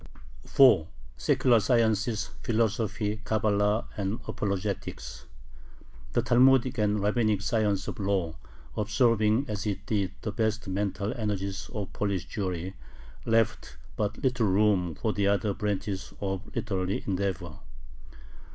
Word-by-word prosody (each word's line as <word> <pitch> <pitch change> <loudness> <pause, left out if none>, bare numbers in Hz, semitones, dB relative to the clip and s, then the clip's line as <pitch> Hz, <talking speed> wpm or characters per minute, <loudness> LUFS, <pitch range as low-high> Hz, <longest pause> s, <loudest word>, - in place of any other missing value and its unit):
4. 125 - +6 0.3
SECULAR 120 -3 +3
SCIENCES, 110 0 +1
PHILOSOPHY, 110 -1 0
CABALA, 105 0 +1
AND 100 +2 -2
APOLOGETICS 100 0 -4 0.9
The 120 - +2
Talmudic 130 0 +4
and 105 -1 +1
Rabbinic 105 -2 +1
science 105 -3 +1
of - - -5
law, 95 -5 0 0.4
absorbing 110 +2 +2
as 105 0 -3
it 100 0 -3
did 100 -4 -1
the 105 - -2
best 110 -1 -1
mental 100 +2 -1
energies 100 -4 -3
of 105 -3 -4
Polish 100 -4 -2
Jewry, 95 -2 -3 0.5
left 115 -1 +1 0.2
but 105 0 -2
little 125 -4 +2
room 95 -4 +2
for 110 +6 -1
the 100 -1 +1
other 100 0 +1
branches 100 -2 -3
of 95 -1 -3
literary 95 -1 -1
endeavor. 95 -5 -2
105 Hz, 115 wpm, -28 LUFS, 100-110 Hz, 0.9 s, 4